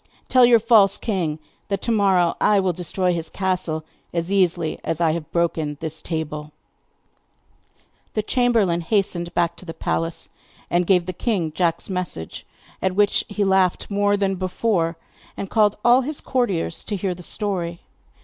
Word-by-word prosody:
'Tell 255 -2 +6
your 240 -1 +7
false 215 -3 +5
king 175 -8 -2 0.3
that 200 -1 -1
to 235 - 0
morrow 190 -5 +3
I 205 -1 +4
will 190 -2 +1
destroy 180 +1 -1
his 165 -1 -3
castle 180 -5 -2 0.3
as 170 +2 -2
easily 175 -4 +1
as 165 - -2
I 165 -2 +3
have 160 -1 -5
broken 160 -3 0
this 160 -1 -5
table.' 150 -2 -4 1.6
The 215 - 0
chamberlain 220 -8 +2
hastened 175 -2 -1
back 170 -1 +1
to - - -11
the 165 - -7
palace, 165 0 -2 0.4
and 175 0 +2
gave 180 -3 +4
the 185 - -4
king 180 -5 -1
Jack's 165 0 0
message, 180 - -4 0.3
at 190 -1 0
which 205 0 +2
he 205 0 -1
laughed 190 0 +2
more 205 0 +2
than 195 -1 0
before, 180 -2 0 0.4
and 195 - -5
called 210 -2 +3
all 245 +2 +6
his 290 +3 -3
courtiers 200 -11 -1
to 210 - -2
hear 190 -1 -1
the 180 - -11
story. 175 -3 -3
185 Hz, 160 wpm, -22 LUFS, 170-205 Hz, 1.6 s, your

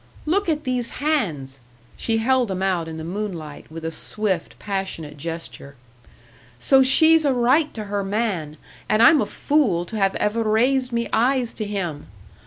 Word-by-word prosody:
Look 360 +4 +1
at 305 -1 0
these 250 -2 -2 0.2
hands!" 155 - -1 0.4
She 225 -1 0
held 255 +2 +2
them 190 -1 -3
out 180 -4 0
in 160 0 -7
the 160 - -6
moonlight, 170 -5 -6
with 165 0 -7
a 165 - -2
swift, 190 0 -3
passionate 190 -7 -4
gesture. 160 -2 -7 0.8
"So 265 - +4
she's 315 +5 +5
a 275 -3 +2
right 260 +6 +3
to 220 - -4
her 200 -1 -3
man, 195 -7 -2 0.3
and 215 +2 +4
I'm 290 +4 +7
a - - -1
fool 230 - +1
to 220 - -6
have 195 -2 +1
ever 215 +2 0
raised 250 +4 +2
me 235 0 -1
eyes 245 +1 +2
to 215 - -4
him! 180 -8 -4
215 Hz, 170 wpm, -22 LUFS, 170-255 Hz, 0.8 s, I'm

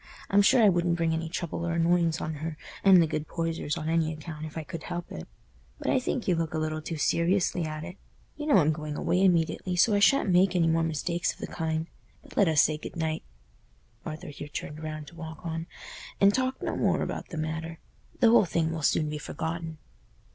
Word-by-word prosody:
I'm 200 +1 +6
sure 235 +4 +5
I - - +7
wouldn't 175 -1 +1
bring 165 -1 +1
any 160 0 -2
trouble 170 -1 -4
or 170 -1 -1
annoyance 170 -1 +2
on 155 - -3
her 160 -1 -4 0.3
and 190 -2 +8
the - - +2
good 155 -1 -3
Poysers 165 -3 -2
on 155 - -4
any 160 -1 +1
account 155 0 -7
if 155 - -10
I 160 - -3
could 160 +2 -7
help 175 0 -6
it. 80 - -7 0.5
But - - -1
I 265 - +3
think 250 -1 -3
you 185 - +4
look 165 -1 -2
a - - 0
little 155 0 -2
too 160 +1 -5
seriously 175 +2 +1
at 155 0 -5
it. 180 +4 -8 0.4
You 295 - -5
know 295 - +5
I'm 155 -4 +4
going 150 -1 -4
away 185 - +1
immediately, 180 0 +2
so 210 +5 +4
I 205 - +3
shan't 205 -1 +4
make 180 +1 +4
any 170 -2 +3
more 165 0 +2
mistakes 165 +2 -1
of - - -20
the - - -4
kind. 160 -1 -2 0.4
But - - -16
let 200 - +4
us 155 -2 +5
say 155 0 0
good - - -8
night"—Arthur 150 - -7
here 145 0 -8
turned 150 +1 -6
round 155 -1 -5
to - - -17
walk 160 0 -9
on—"and 165 +4 -1
talk 260 +2 0
no - - -2
more - - +1
about - - -4
the 165 - -6
matter. 160 +1 -4 0.4
The 230 -2 +6
whole 230 -3 +6
thing 165 -1 0
will 165 -1 -4
soon 155 +1 +2
be 150 0 -4
forgotten." 160 +2 -4
165 Hz, 220 wpm, -28 LUFS, 155-175 Hz, 0.5 s, and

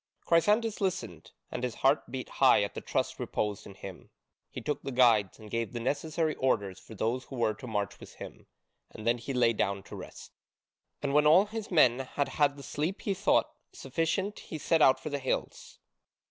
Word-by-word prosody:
Chrysantas 210 +7 +2
listened, 180 - -3 0.2
and 125 - -4
his 125 -2 -2
heart 135 +3 +2
beat 130 -1 -5
high 130 -6 +4
at 100 - -4
the - - -6
trust - - -2
reposed 105 -1 -3
in 100 - -11
him. 95 -2 -10 0.4
He - - -7
took 150 - -3
the 135 - -5
guides, 115 -6 +4
and 110 - -12
gave 115 +1 -2
the 120 - -3
necessary 155 +5 -1
orders 100 -7 0
for 110 - -13
those 120 +5 -1
who 135 - -9
were 115 -3 +1
to 115 +4 -10
march 105 -3 -2
with - - -12
him, - - -10 0.4
and 110 - -10
then 120 +1 +2
he 120 - -5
lay 125 -3 +3
down 100 -2 -1
to - - -10
rest. - - -10 0.7
And 140 -1 0
when 150 +1 +5
all 175 +6 +7
his 220 0 -6
men 130 -8 +5
had 135 +2 -2
had 145 -2 +1
the 140 - -10
sleep 160 +9 -3
he 200 - -1
thought 185 - +2 0.2
sufficient 165 +9 -2
he 160 - -7
set 160 +2 +1
out 130 -2 +6
for 155 - -6
the 145 - -1
hills. 130 - -3
130 Hz, 200 wpm, -30 LUFS, 115-155 Hz, 0.7 s, all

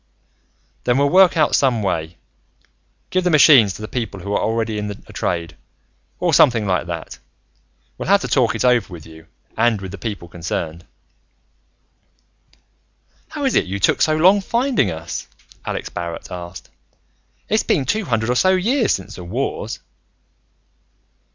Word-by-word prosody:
"Then 120 +1 +2
we'll 140 0 +2
work 185 -1 +5
out 155 - +3
some 125 -6 +2
way. 80 -3 -2 0.9
Give 185 0 +1
the 180 - +2
machines 140 - +6
to 110 - -9
the - - -4
people 110 -5 -4
who 100 +3 -4
are - - +1
already 110 -1 -1
in 105 0 -4
a 100 - -10
trade, 85 -3 -3 0.6
or - - 0
something 115 -4 +4
like 90 -3 0
that. 85 -2 -6 0.8
We'll - - -4
have 200 0 +5
to - - -3
talk 125 -4 +2
it 110 - -1
over 125 -5 +2
with 85 -3 -10
you 80 0 -14 0.3
and 115 -1 +2
with 95 -1 -7
the 100 - -9
people 100 -5 -5
concerned." 85 -1 -5 2.4
"How 290 -2 -4
is 265 - +1
it - - +2
you 95 +2 -4
took - - +2
so 155 - +3
long 190 +5 +5
finding 240 - +1
us?" 80 0 -6 0.4
Alex - - -4
Barrett 85 -1 -6
asked. 90 +1 -8 0.8
"It's 215 +1 +2
been 140 - 0
two 215 +5 -1
hundred 115 -3 0
or - - 0
so 185 +8 +4
years 225 +5 +1
since 95 - -4
the 90 - -8
Wars." 110 +3 -3
110 Hz, 160 wpm, -20 LUFS, -, 2.4 s, machines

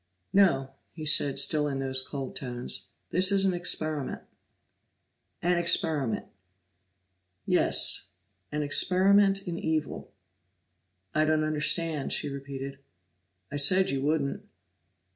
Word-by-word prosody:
"No," 170 -9 +3 0.2
he 155 -2 -7
said, 145 -2 +3
still 150 +2 +2
in 140 -2 -3
those 130 -1 +1
cold 135 -1 -6
tones. 125 -2 -2 0.2
"This 185 +3 +3
is 195 -1 +4
an 190 - +2
experiment." 155 -5 -2 1.2
"An 175 0 +2
experiment!" 155 -8 0 1.2
"Yes. - - +2 0.4
An 150 0 -2
experiment 195 +6 +3
in 170 -1 -4
evil." 160 -1 -3 1.0
"I 155 - +2
don't 155 0 +1
understand," 155 0 0
she 150 - 0
repeated. 135 0 -7 0.7
"I 145 - -3
said 185 +6 +4
you 135 -1 -2
wouldn't." 145 -1 -1
155 Hz, 110 wpm, -28 LUFS, 140-175 Hz, 1.2 s, is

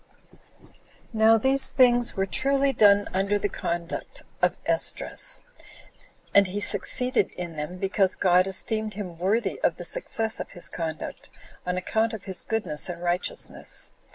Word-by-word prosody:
3. - - -24 0.7
Now 220 0 +5
these 265 +4 +2
things 245 -2 +3
were 195 - 0
truly 275 +8 +1
done 205 -3 +5
under 195 +2 +1
the 205 - -1
conduct 170 -3 -5 0.2
of - - +2
Esdras; - - 0 0.9
and 200 -1 +6
he 195 +3 -4
succeeded 250 +1 +2
in 175 -2 -6
them, 150 +4 -5
because 195 0 +1
God 180 0 +3
esteemed 215 +2 -1
him 180 -5 -7
worthy 195 +2 0
of 165 - +2
the 175 - -8
success 225 +5 -2
of - - -7
his 175 - -2
conduct, 160 -2 -5 0.4
on 180 0 -1
account 220 +5 0
of 210 - -10
his 190 -3 -4
goodness 210 -9 -1
and 175 0 -6
righteousness. 175 +1 -3
200 Hz, 150 wpm, -26 LUFS, 180-225 Hz, 0.9 s, and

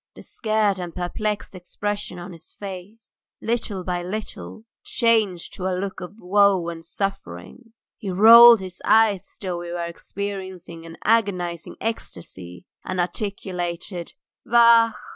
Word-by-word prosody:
The - - -12
scared 215 -3 0
and 175 -2 -6
perplexed 205 +5 -3
expression 205 +1 -5
on 175 +1 -8
his 165 0 -14
face, 200 +3 -10 0.2
little 225 -5 -2
by 180 -1 -2
little, 215 +3 -7 0.2
changed 220 -7 +1
to 185 - -4
a 185 -1 -1
look 195 +1 -5
of 180 +5 -9
woe 195 -2 +3
and 165 -1 -8
suffering; 195 - -6 0.3
he 200 - -5
rolled 230 +4 +9
his 185 -1 -9
eyes 220 -4 +4
as - - -15
though 180 -3 -4
he 175 - -7
were 170 0 -3
experiencing 185 -2 -7
an 165 0 -11
agonizing 185 -7 0
ecstasy, 90 - -7 0.2
and 185 0 -4
articulated, 180 -2 -4 0.3
"Vachhh!" 235 -1 +5
190 Hz, 135 wpm, -23 LUFS, 175-215 Hz, 0.3 s, rolled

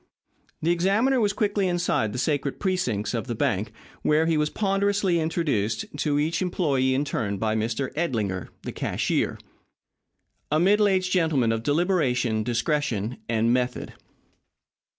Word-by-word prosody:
The 165 - +3
examiner 200 +10 +2
was 205 -2 +2
quickly 205 -1 0
inside 175 -11 0
the 125 - -5
sacred 140 +1 -1
precincts 125 - -1
of 115 +1 -3
the 120 - -3
bank, 110 -4 0 0.3
where 155 +1 +3
he 165 0 +2
was 150 0 +1
ponderously 195 -2 +1
introduced 155 - -1
to 145 -1 0
each 155 +2 0
employee 140 -8 +1
in 140 +2 0
turn 100 -7 -2
by 110 +2 0
Mr. 115 +5 -2
Edlinger, 110 - -1 0.2
the - - -4
cashier - - -1 1.1
a 155 - +3
middle 205 +4 +4
aged 185 -2 +1
gentleman 160 -10 +2
of 115 0 -1
deliberation, 135 - +1
discretion, 120 -1 -1
and 115 +1 +2
method. 125 0 -2
145 Hz, 140 wpm, -25 LUFS, 115-180 Hz, 1.1 s, middle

